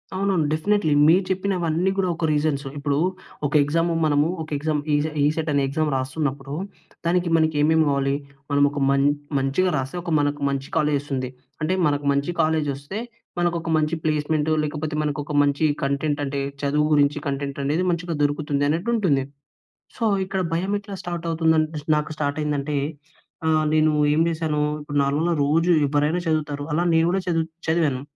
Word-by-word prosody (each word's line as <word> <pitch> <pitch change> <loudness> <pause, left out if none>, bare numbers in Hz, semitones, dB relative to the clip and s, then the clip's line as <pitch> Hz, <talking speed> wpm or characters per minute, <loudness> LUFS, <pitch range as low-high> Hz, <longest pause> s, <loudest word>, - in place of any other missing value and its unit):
అవునవును 190 -5 +1
డెఫినెట్లీ. 160 0 +1
మీరు 180 +4 +5
చెప్పినవన్నీ 185 -2 0
కూడా 190 -2 +1
ఒక 170 - -2
రీజన్సు. 145 -2 0
ఇప్పుడు 140 0 -1 0.5
ఒక 145 - -2
ఎగ్జాము 165 +3 0
మనము 145 +1 +3
ఒక 155 - -7
ఎగ్జామ్ 150 0 -1
ఈసె 145 +2 +1
ఈసెట్ 155 +2 0
అనే 140 - +2
ఎగ్జామ్ 155 +2 0
రాస్తున్నప్పుడు 135 +1 -3 0.5
దానికి 175 0 +1
మనకి 160 -1 +2
ఏమేమి 160 +1 +4
కావాలి? 140 0 +1 0.4
మనం 140 0 +3
ఒక 145 - -4
మం 140 0 +3 0.4
మంచిగా 145 +8 +1
రాస్తే 135 +6 -4
ఒక 170 - -4
మనకు 145 0 -1
మంచి 135 0 -3
కాలేజ్ 150 -2 +2
వస్తుంది. 130 -3 -3 0.3
అంటే 165 +4 +1
మనకు 145 0 -1
మంచి 140 +5 0
కాలేజ్ 155 -2 +1
ఒస్తే 145 +10 -6 0.4
మనకు 175 0 +1
ఒక 165 - -5
మంచి 155 +2 +1
ప్లేస్‌మెంట్ 155 0 0
లేకపోతే 150 +1 -3
మనకొక 150 0 -3
మంచి 145 +2 +1 0.2
కంటెంట్ 145 +2 0
అంటే 140 0 -3 0.2
చదువు 150 +1 +1
గురించి 145 0 +3
కంటెంట్ 140 0 -3
అనేది 155 +6 0
మంచిగా 170 -1 -2
దొరుకుతుంది 145 -1 0
అన్నట్టు 170 +9 -1
ఉంటుంది. 150 -11 +2 0.7
సో 235 - -3 0.2
ఇక్కడ 190 0 -2
భయం 190 +5 -1
ఎట్లా 200 -1 -8
స్టార్ట్ 175 -1 -4
అవుతుంది 160 0 +2 0.4
నాకు 150 +1 -1
స్టార్ట్ 145 0 -1
అయిందంటే 145 0 -1 0.7
ఆహ్, 155 -1 +3
నేను 155 0 +4 0.2
ఏం 160 - +2
చేశాను, 155 -2 -1 0.2
ఇప్పుడు 145 0 -4
నాల 150 +5 +1
రోజు 165 +5 +2 0.2
ఎవ్వరైనా 150 +4 +1
చదువుతారు, 150 -2 -1
అలా 170 +3 +1
నేను 165 0 +4
కూడా 190 +2 +1
చదువు 165 -2 +1 0.2
చదివాను. 155 -6 +1
155 Hz, 165 wpm, -23 LUFS, 145-165 Hz, 0.7 s, మీరు